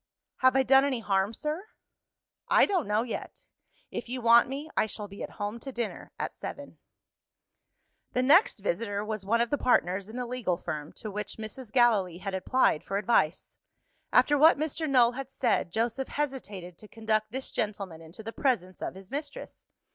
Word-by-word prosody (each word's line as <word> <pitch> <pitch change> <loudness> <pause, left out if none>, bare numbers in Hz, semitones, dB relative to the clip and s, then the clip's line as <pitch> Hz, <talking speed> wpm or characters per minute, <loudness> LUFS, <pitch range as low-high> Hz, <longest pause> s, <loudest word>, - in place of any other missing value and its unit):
"Have 260 0 +4
I 265 - +5
done 270 +1 +6
any 275 -4 0
harm, 195 -1 +1
sir?" 300 - -3 0.8
"I - - +6
don't 370 - 0
know 210 +2 +2
yet. 240 - -7 0.5
If - - -5
you 255 +1 -3
want 235 +1 +6
me, 280 +3 -5
I - - +2
shall 210 -1 -6
be 200 0 -11
at - - -4
home 210 +2 -5
to 270 +3 -7
dinner 240 -3 -5
at - - -3
seven." - - -8 1.3
The 250 - +1
next 330 - +5
visitor 210 - -2
was 215 -3 -4
one 230 +3 +3
of 235 - 0
the 290 - +1
partners 190 -4 +2
in 220 - -9
the 250 0 -2
legal 235 -8 -1
firm, 155 -3 -5
to 215 - -7
which 210 +1 -5
Mrs. 220 +2 -8
Gallilee 215 -9 +3
had 195 +1 -5
applied 190 -2 +2
for 195 - -2
advice. 190 -5 +1 0.6
After 290 -1 +4
what 315 +1 +7
Mr. 310 +1 -2
Null 245 -3 +5
had 265 +1 -6
said, 240 -9 0
Joseph 235 +6 -1
hesitated 210 - -4
to 215 - -12
conduct 215 -1 -1
this 265 +2 -5
gentleman 195 -6 -3
into 165 +7 -11
the 225 +1 -6
presence 195 -10 -1
of - - -4
his 190 +2 -12
mistress. 285 0 -6
230 Hz, 185 wpm, -29 LUFS, 200-265 Hz, 1.3 s, what